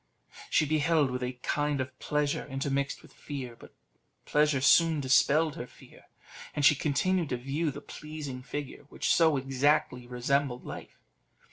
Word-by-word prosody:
She -, -, +3 dB
beheld 155 Hz, -1 st, +2 dB
with 125 Hz, 0 st, -3 dB
a 125 Hz, 0 st, -2 dB
kind 145 Hz, -1 st, 0 dB
of 130 Hz, 0 st, -5 dB
pleasure 150 Hz, -2 st, -1 dB
intermixed 140 Hz, 0 st, -2 dB
with -, -, -17 dB
fear, 130 Hz, -5 st, -7 dB
but -, -, -16 dB, 0.5 s
pleasure 150 Hz, -2 st, +2 dB
soon 160 Hz, +4 st, +5 dB
dispelled 145 Hz, +3 st, +3 dB
her 120 Hz, -, -6 dB
fear, -, -, -18 dB, 0.5 s
and 145 Hz, -, +1 dB
she 145 Hz, -, +8 dB
continued 160 Hz, +4 st, 0 dB
to 125 Hz, -, -1 dB
view 140 Hz, +6 st, -2 dB
the 145 Hz, +1 st, -7 dB
pleasing 150 Hz, -4 st, -7 dB
figure, 135 Hz, +2 st, -7 dB
which -, -, 0 dB
so 160 Hz, -4 st, +4 dB
exactly 135 Hz, -2 st, +1 dB
resembled 125 Hz, +1 st, -1 dB
life. -, -, -9 dB
140 Hz, 150 wpm, -29 LUFS, 130-150 Hz, 0.5 s, she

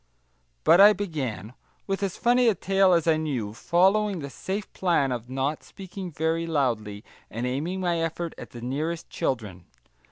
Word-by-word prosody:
But 175 Hz, -, +6 dB
I 205 Hz, +1 st, +9 dB
began, 135 Hz, -, -4 dB, 0.3 s
with 195 Hz, 0 st, -2 dB
as 195 Hz, -3 st, -2 dB
funny 245 Hz, +1 st, +3 dB
a 220 Hz, -, +4 dB
tale 195 Hz, +1 st, +3 dB
as 170 Hz, -2 st, +2 dB
I 160 Hz, -2 st, +3 dB
knew, 130 Hz, -10 st, -3 dB
following 195 Hz, -, +2 dB
the 140 Hz, -4 st, -6 dB
safe 195 Hz, +7 st, -5 dB
plan 165 Hz, -8 st, +1 dB
of 120 Hz, -1 st, -4 dB
not 135 Hz, +3 st, -2 dB
speaking 190 Hz, -1 st, -8 dB
very 160 Hz, +2 st, -1 dB
loudly, 115 Hz, -9 st, -1 dB, 0.3 s
and 115 Hz, +3 st, -4 dB
aiming 155 Hz, +9 st, -2 dB
my 175 Hz, -2 st, 0 dB
effort 165 Hz, +1 st, -3 dB
at -, -, -10 dB
the 120 Hz, -, -10 dB
nearest 155 Hz, +7 st, -3 dB
children. 105 Hz, -9 st, -3 dB
160 Hz, 165 wpm, -26 LUFS, 130-190 Hz, 0.3 s, I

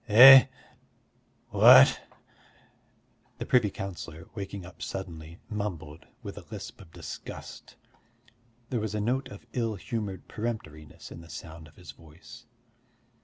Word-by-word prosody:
"Eh? 130 Hz, +5 st, +10 dB, 1.0 s
What?" -, -, +7 dB, 1.4 s
the -, -, -5 dB
privy 120 Hz, -5 st, +3 dB
councillor, 85 Hz, -4 st, -8 dB
waking 100 Hz, -2 st, -7 dB
up 90 Hz, -, -14 dB
suddenly, 85 Hz, -3 st, -7 dB
mumbled, 85 Hz, -8 st, -6 dB, 0.2 s
with -, -, -8 dB
a -, -, -16 dB
lisp -, -, -9 dB
of 90 Hz, -4 st, -16 dB
disgust. -, -, -10 dB, 1.0 s
There 120 Hz, -, 0 dB
was 110 Hz, -1 st, -4 dB
a -, -, -1 dB
note 125 Hz, +6 st, -1 dB
of 100 Hz, +3 st, -13 dB
ill 115 Hz, -3 st, -2 dB
humoured 105 Hz, -2 st, -6 dB
peremptoriness 105 Hz, -10 st, -7 dB
in 85 Hz, -, -10 dB
the 85 Hz, -, -15 dB
sound 80 Hz, 0 st, -10 dB
of 75 Hz, -, -21 dB
his 90 Hz, -6 st, -12 dB
voice. 85 Hz, +11 st, -16 dB
95 Hz, 125 wpm, -28 LUFS, 80-110 Hz, 1.4 s, Eh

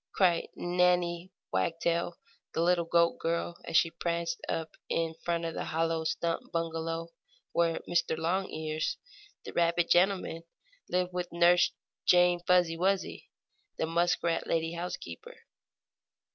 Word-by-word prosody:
cried 175 Hz, -3 st, +3 dB
Nannie 180 Hz, 0 st, +1 dB, 0.2 s
Wagtail, 170 Hz, -, 0 dB, 0.4 s
the -, -, +1 dB
little 175 Hz, -1 st, +3 dB
goat 170 Hz, 0 st, +3 dB
girl, 170 Hz, +1 st, -2 dB
as -, -, +2 dB
she 165 Hz, -, +4 dB
pranced 170 Hz, 0 st, -2 dB
up 160 Hz, -1 st, -3 dB
in 165 Hz, -1 st, 0 dB
front 170 Hz, -1 st, -1 dB
of 165 Hz, -, -3 dB
the -, -, -4 dB
hollow 165 Hz, 0 st, 0 dB
stump 165 Hz, +1 st, -2 dB
bungalow 165 Hz, 0 st, -2 dB, 0.4 s
where 170 Hz, -1 st, +1 dB
Mr. 170 Hz, -2 st, +1 dB
Longears, 160 Hz, -2 st, -1 dB, 0.5 s
the -, -, -7 dB
rabbit 170 Hz, 0 st, +2 dB
gentleman, 180 Hz, -2 st, +3 dB, 0.5 s
lived 180 Hz, 0 st, 0 dB
with 180 Hz, -1 st, -3 dB
Nurse 175 Hz, +1 st, +5 dB, 0.3 s
Jane 175 Hz, 0 st, +5 dB
Fuzzy 180 Hz, -2 st, +4 dB
Wuzzy, 190 Hz, +2 st, -1 dB, 0.5 s
the -, -, 0 dB
muskrat 170 Hz, 0 st, +1 dB
lady 165 Hz, 0 st, 0 dB
housekeeper. 170 Hz, -, -7 dB
170 Hz, 125 wpm, -30 LUFS, 165-175 Hz, 0.5 s, Nurse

